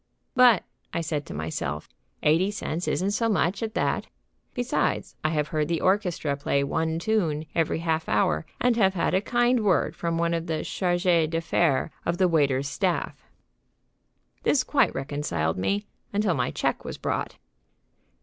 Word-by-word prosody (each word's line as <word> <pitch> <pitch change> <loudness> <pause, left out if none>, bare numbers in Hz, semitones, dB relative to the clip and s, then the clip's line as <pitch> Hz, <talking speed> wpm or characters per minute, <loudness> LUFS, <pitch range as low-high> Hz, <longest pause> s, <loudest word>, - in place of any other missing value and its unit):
"But," 245 -6 +6 0.3
I 170 - 0
said 155 -2 -3
to - - -7
myself, 75 -1 -3 0.4
"eighty 165 +6 +4
cents 180 -4 -3
isn't 190 +3 0
so 230 +2 +1
much, 190 0 +1
at 225 0 -3
that. - - 0 0.5
Besides, 245 0 -1
I 155 - +2
have 150 -2 -1
heard 155 -2 0
the 165 0 0
orchestra 180 -7 +1
play 140 0 0
one 160 +3 -1
tune 165 -6 0
every 165 -2 +1
half 160 -1 -1
hour, 80 -7 +2 0.2
and 245 -1 +3
have 195 -4 +3
had 170 - 0
a 190 - +3
kind 240 +2 +2
word 185 -7 +2
from 170 -1 -2
one 170 0 +1
of 165 0 -2
the 160 -1 -2
chargés 175 -3 +1
d'affaires 165 -2 +1
of 170 - -1
the 185 - +4
waiter's 140 -5 +2
staff." 180 +4 -2 1.2
This 270 -3 +3
quite 275 +2 +2
reconciled 135 - -2
me, 200 - 0 0.3
until 205 -2 +1
my 125 -5 0
check - - -1
was - - -6
brought. - - -3
170 Hz, 160 wpm, -26 LUFS, 150-200 Hz, 1.2 s, But